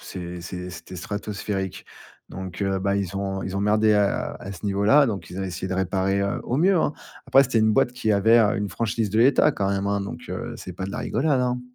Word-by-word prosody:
c'est 90 -1 -7
c'est 90 +1 -6
c'était 90 +1 -10
stratosphérique, 100 0 -4 0.4
donc 95 +1 -6
heu, 95 -1 0
bah, 100 +1 0
ils 100 -1 -2
ont 95 -1 -2
ils 95 +1 -4
ont - - -1
merdé 105 +1 +3
à 100 -1 +1
à 100 - -7
ce 95 +3 -11
niveau 100 0 0
là, 140 +6 +6
donc 100 -4 -4
ils 90 - -7
ont - - -2
essayé 90 0 -4
de 95 - -2
réparer, 95 +1 0
heu, 100 0 -1
au 125 - -1
mieux, 185 +4 +4
hein. 155 - +1 0.3
Après, 135 - +6
c'était 125 -3 0
une 110 0 +3
boîte 120 - +3
qui 110 -4 0
avait, 110 +4 +5
heu, 105 -3 +3
une 105 0 -2
franchise 110 -2 -2
de 110 - 0
l'État 135 +5 +5
quand 100 -8 -1
même, 100 0 -1
hein, 100 0 0
donc 100 - -6
heu, - - -5
c'est 90 - -8
pas 95 +2 -5
de 100 - -6
la - - -4
rigolade, 135 +2 +1
hein. 125 0 0
100 Hz, 250 wpm, -24 LUFS, 95-110 Hz, 0.4 s, là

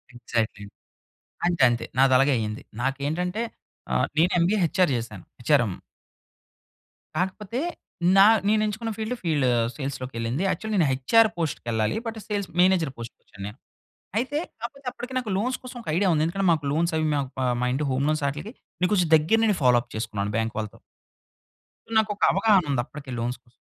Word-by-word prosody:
Exactly. 115 -4 -2 0.8
అంతే, 175 -5 +1
అంతే. 120 -1 -1
నాదలాగే 135 +1 +5
అయింది. 110 0 -4 0.2
నాకేంటంటే 160 - -1 0.5
ఆహ్, - - +2
నీను 170 +3 +4
ఎంబీఏ 180 +5 +3
హెచ్ 170 +3 -2
ఆర్ 175 - +4
జేశాను. 110 -6 -5 0.2
H 120 - -7
R 125 - +2
M. 95 - -4 1.4
కాకపోతే, 205 +6 -2 0.6
నా 195 - +9 0.2
నేనెంచుకున్న 215 +1 0
ఫీల్డ్ 220 +3 -2
ఫీల్డ్ 150 -6 +1 0.3
సేల్స్‌లోకెళ్ళింది. 130 0 -3
యాక్చువల్‌గా 215 +1 -2
నేను 160 - +4
H 130 - -6
R 225 - +6
పోస్ట్‌కెళ్ళాలి. 115 - -1
But 225 - -4
sales 205 -2 -2
manager 180 -6 +3
పోస్ట్‌కొచ్చేను 110 -3 -10
నేను. 105 +5 -9 0.6
అయితే, 285 +4 -2 0.2
కాపోతే 270 +3 -7
అప్పటికి 250 +2 -8
నాకు 250 -4 -2
లోన్స్ 250 +5 -1
కోసం 250 0 -9
ఒక - - -18
ఐడియా 195 +2 +2
ఉంది. 155 -1 +2
ఎందుకంటే, 190 +3 0
మాకు 155 -3 +1
లోన్స్ 170 +2 +1
అవి 155 - +1
మాక్ 140 -2 -2
ఆహ్, 125 - +1
మా 125 - +1
ఇంటి 145 +2 -1
హోమ్ 130 +2 0
లోన్స్ 155 -1 0
ఆటిలికి 150 - -7 0.3
నే 180 - +4
కొంచెం 180 -5 +2
దగ్గర 160 +9 +3
నుండి 215 -3 +3
ఫాలో 125 -1 +6
అప్ 120 - -19
చేసుకున్నాను 105 -2 -3
బాంక్ 115 0 -1
వాళ్ళతో. 105 -1 -6 1.2
నాకొక 210 -1 +1
అవగాహన 195 -2 +4
ఉందప్పటికే 135 +2 -4
లోన్స్ 120 +2 -2
కోసం. 120 -1 -30
155 Hz, 165 wpm, -25 LUFS, 125-205 Hz, 1.4 s, నా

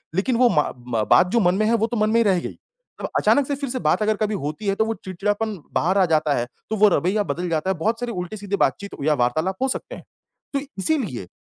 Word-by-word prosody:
लेकिन 230 +7 +1
वो 245 -1 +5
मा 150 - +1 0.2
मा 115 -3 0
बात - - +5
जो 235 - +3
मन 180 -3 +3
में 215 - +1
है 225 - +2
वो 225 0 +1
तो 240 - -3
मन 215 0 +2
में 225 - 0
ही - - +4
रह 190 -4 +3
गई, - - -7 0.4
अब - - -3
अचानक 285 -2 +3
से 285 - -1
फिर 280 -2 -4
से 255 0 -3
बात - - +1
अगर 215 0 +2
कभी 215 -1 -1
होती 155 +8 -4
है 195 - +2
तो 220 - +1
वो 225 - -1
चिड़चिड़ापन 205 +3 -2 0.2
बाहर 185 +5 +1
आ 190 - +5
जाता 155 -3 +2
है, 120 - 0 0.2
तो 220 - -1
वो 210 0 +6
रवैया 195 +3 +1
बदल 175 -2 -3
जाता 160 +3 -1
है, 190 - +1
बहुत 220 +8 0
सारे 245 -1 -3
उल्टे-सीधे 200 +2 -4
बातचीत 200 0 -4
या 155 +1 +3
वार्तालाप 150 +8 0
हो 265 - +2
सकते - - -4
हैं, - - -12 0.5
तो 275 - +1 0.2
इसीलिए 190 - -1
200 Hz, 265 wpm, -22 LUFS, 175-225 Hz, 0.5 s, वो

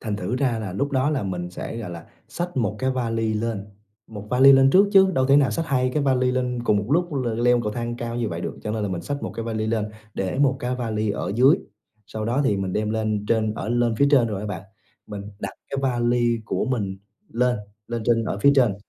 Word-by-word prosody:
Thành 105 -3 -3
thử 105 +6 -2
ra 125 -5 0
là 105 -4 -5
lúc 140 +10 -1
đó 135 +1 +1
là 145 -4 -1
mình 90 -2 -4
sẽ, 90 - -6
gọi 110 -6 -5
là, 85 -1 -9 0.2
xách 175 -2 -5
1 105 -4 0
cái 130 0 0
vali 115 -3 -1
lên, 110 -2 -2 0.4
1 105 -2 -9
vali 130 +2 +7
lên 135 0 +6
trước 195 +6 +6
chứ 190 -1 +6
đâu 130 0 +2
thể 140 +1 +5
nào 140 -3 +4
xách 165 -1 -2
2 130 -3 +1
cái 150 - +1
vali 130 -2 +2
lên 125 -1 -1
cùng 105 - +3
một 100 - 0
lúc 175 +2 +1
l 130 -3 -1 0.2
leo 125 0 +4
cầu 105 - -2
thang 120 +1 -4
cao 120 0 -4
như 120 -2 -1
vậy 85 -2 -5
được, - - -4
cho 105 - -3
nên 110 0 -2
là 105 - -1
mình 90 -3 -4
xách 140 +11 -4
1 - - -3
cái 115 - -4
vali 110 -1 -2
lên, 110 -1 -1 0.2
để 95 +6 -2
1 135 -1 +3
cái 125 +1 -1
vali 110 -3 -2
ở 100 - -3
dưới, 130 - +6 0.5
sau 110 -1 -5
đó 120 +5 0
thì 105 -7 +2
mình 95 -1 -2
đem 105 +2 -1
lên 110 -2 -1
trên 110 -2 +1
ở 110 - -5
lên 120 -1 +1
phía 140 - +5
trên 130 -5 +5
rồi 105 -3 -3
á, 105 - -5
bạn. 95 -3 -5 0.4
Mình 105 -1 -6 0.2
đặt 100 -2 -5 0.2
cái 140 - -2
vali 120 -2 +1
của - - -1
mình 105 -7 -2 0.3
lên, 125 +1 +1 0.3
lên 120 -1 -3
trên 115 -1 +2
ở 100 - -3
phía 140 +7 +5
trên 120 -8 +4
115 Hz, 255 wpm, -23 LUFS, 105-130 Hz, 0.5 s, vali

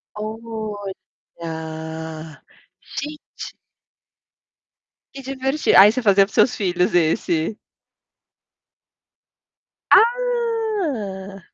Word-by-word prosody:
Olha, 165 -8 -7 0.6
gente! 300 0 -7 1.6
Que 275 - -9
diverti 270 +2 0
aí 200 +3 +9
você 255 +2 -2
fazia 200 -2 +5
para 195 - -17
os - - -18
seus 250 - +4
filhos, 180 -3 0
esse. 165 +3 +1 2.3
Ah! 435 - +1
205 Hz, 70 wpm, -21 LUFS, 175-270 Hz, 2.3 s, aí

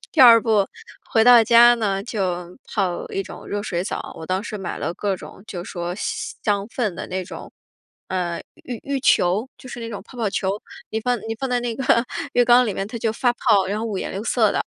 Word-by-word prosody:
第 - - +2
二 235 -3 +10
步， 215 -4 +2 0.5
回 225 0 +5
到 245 -2 +8
家 235 +1 +7
呢， 200 -4 -1
就 180 -5 -3
泡 185 -5 -2
一 195 - -2
种 - - -11
热 205 0 -3
水 180 -3 -2
澡， - - -5
我 160 - -8
当 185 +2 -1
时 215 - -5
买 190 - -5
了 170 - -3
各 200 -2 -1
种 190 - -12
就 175 -2 -6
说 175 -1 -4
香 225 - -2
氛 220 -6 -2
的 - - -6
那 185 0 -3
种， - - -10 0.6
嗯， 175 -2 -2 0.2
浴 245 -2 -5
浴 280 -1 -2
球， 205 -1 +3
就 255 - -12
是 240 - -7
那 230 - -5
种 205 -3 -6
泡 250 - -15
泡 220 -4 0
球， 190 - -1 0.4
你 220 - -2
放 245 +1 0
你 225 - -2
放 265 -1 -3
在 245 -1 +1
那 240 -1 -3
个 240 -2 +2 0.3
浴 245 - +5
缸 245 +1 +6
里 210 - -1
面， 195 - -3
它 235 - -6
就 225 -1 0
发 245 +2 +1
泡， 210 -6 +3
然 205 +2 -2
后 220 - -3
五 205 -4 -3
颜 - - -4
六 200 +4 -4
色 225 -3 +3
的。 - - 0
215 Hz, 250 characters per minute, -22 LUFS, 190-240 Hz, 0.6 s, 二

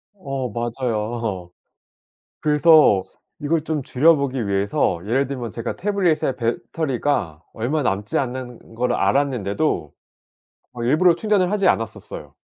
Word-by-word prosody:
어 135 -8 -4
맞아요. 115 -5 -3 0.9
그래서 150 - +5 0.4
이걸 155 +1 0
좀 155 -2 -2
줄여 155 +6 +4
보기 130 -5 -2
위해서 100 -3 0
예를 135 +5 +1
들면 125 -4 -5
제가 115 +2 -5
태블릿에 175 -9 0
배터리가 120 - -2
얼마 135 +7 -1
남지 105 -3 -1
않은 125 -3 -5
걸 125 +1 0
알았는데도 120 - 0 0.8
어 120 -1 -5
일부러 160 +8 +4
충전을 200 -1 +1
하지 205 -2 +2
않았었어요. 115 +3 -2
125 Hz, 275 characters per minute, -21 LUFS, 115-150 Hz, 0.9 s, 그래서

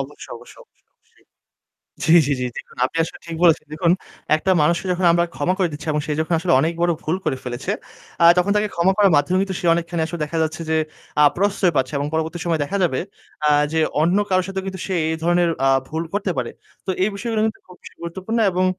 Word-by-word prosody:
অবশ্যই, 135 +2 -8
অবশ্যই, - - -15 0.3
অবশ্যই। - - -32 0.8
জি, 160 - +5
জি, 145 - +1
জি। 125 - -1
দেখুন, - - -9
আপনি 165 - -10
আসলে - - -9
ঠিক 165 - -5
বলেছেন। 165 -3 +4
দেখুন, 170 +2 +2 0.4
একটা 175 +5 -1
মানুষকে 170 +4 +1
যখন 180 0 0
আমরা 170 0 +3
ক্ষমা 175 +6 0
করে 185 -3 +2
দিচ্ছি 145 +3 -8
এবং 150 - 0
সে 150 - -2
যখন 165 +2 0
আসলে 175 -2 0
অনেক 160 +3 +1
বড় 175 0 +3
ভুল 160 +4 -1
করে 150 -4 0
ফেলেছে, 125 +1 -3 0.5
আ - - +7
তখন 180 +3 +2
তাকে 210 0 +1
ক্ষমা 175 +3 +3
করার 200 -4 +4
মাধ্যমে 160 +6 +2
কিন্তু 190 -2 -3
সে 175 - -3
অনেকখানি 170 0 -2
আসলে 170 -1 -6
দেখা 165 +2 -3
যাচ্ছে 160 +1 -2
যে, 160 - +2 0.4
আ - - +7
প্রশ্রয় 195 -1 +1
পাচ্ছে 130 +2 +1
এবং 145 - -2
পরবর্তী 160 +2 -2
সময়ে 165 -3 0
দেখা 195 +8 -3
যাবে, 130 -6 0 0.5
আ - - +5 0.2
যে 160 - +1 0.2
অন্য 175 +5 +3
কারো 185 0 +3
সাথে 190 0 -3
কিন্তু 190 -2 -5
সে 190 - -2 0.2
এই 160 - -1
ধরনের 175 0 +2 0.2
আ - - +5 0.2
ভুল 160 +1 -3
করতে 200 -2 -1
পারে। 120 - -2 0.4
তো - - -1
এই - - +2
বিষয়গুলো 225 0 -2
কিন্তু 220 - -4
খুব 180 - -14
বেশি - - -13
গুরুত্বপূর্ণ। 190 +7 -3
এবং 185 +1 +1
170 Hz, 225 wpm, -21 LUFS, 160-185 Hz, 0.8 s, আ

